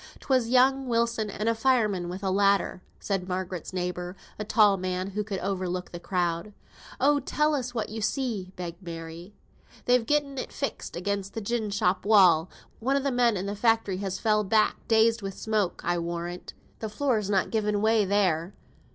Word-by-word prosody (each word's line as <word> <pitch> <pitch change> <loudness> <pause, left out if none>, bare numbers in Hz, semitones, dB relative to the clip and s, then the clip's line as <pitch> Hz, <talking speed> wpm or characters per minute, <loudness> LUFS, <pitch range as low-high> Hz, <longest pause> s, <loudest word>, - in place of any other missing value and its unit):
"'Twas 255 -4 +1
young 260 +1 +4
Wilson 230 -2 0
and 210 +2 -3
a 230 - +4
fireman 220 -7 +1
wi' 180 - -4
a 190 - 0
ladder," 200 -1 +2 0.2
said 195 -3 -2
Margaret's 180 -2 -4
neighbour, 180 0 -3 0.2
a - - -1
tall 210 -1 +4
man 185 +1 -3
who 210 +2 -2
could 200 -2 -4
overlook 185 -2 -3
the 175 - -7
crowd. 175 +2 -2 0.5
"Oh, 285 +2 +4
tell 300 +3 +1
us 250 -3 -3
what 225 - -2
you 220 +1 -5
see?" 220 -5 -2
begged 175 -1 -7
Mary. 170 +2 -8 0.5
"They've 245 -2 +3
gotten 285 -2 0
it - - -5
fixed 275 - -4
again 200 +3 -1
the 225 - -4
gin 220 0 -2
shop 190 -2 +1
wall. 185 -5 +5 0.3
One 265 +4 +1
o' - - 0
the 275 0 0
men 240 -4 +3
i' 185 - -3
th' 200 +1 -3
factory 225 -5 +2
has 195 -1 -3
fell 215 -2 +2
back; 215 +1 +1
dazed 225 0 +4
wi' 195 - -3
the 195 - -11
smoke, 215 -4 -1
I'll 175 0 +1
warrant. 170 +1 -5 0.2
The 220 - -4
floor's 215 -3 0
not 195 -2 +1
given 210 -2 0
way 220 0 +3
there. 190 -3 +1
205 Hz, 185 wpm, -27 LUFS, 185-230 Hz, 0.5 s, wall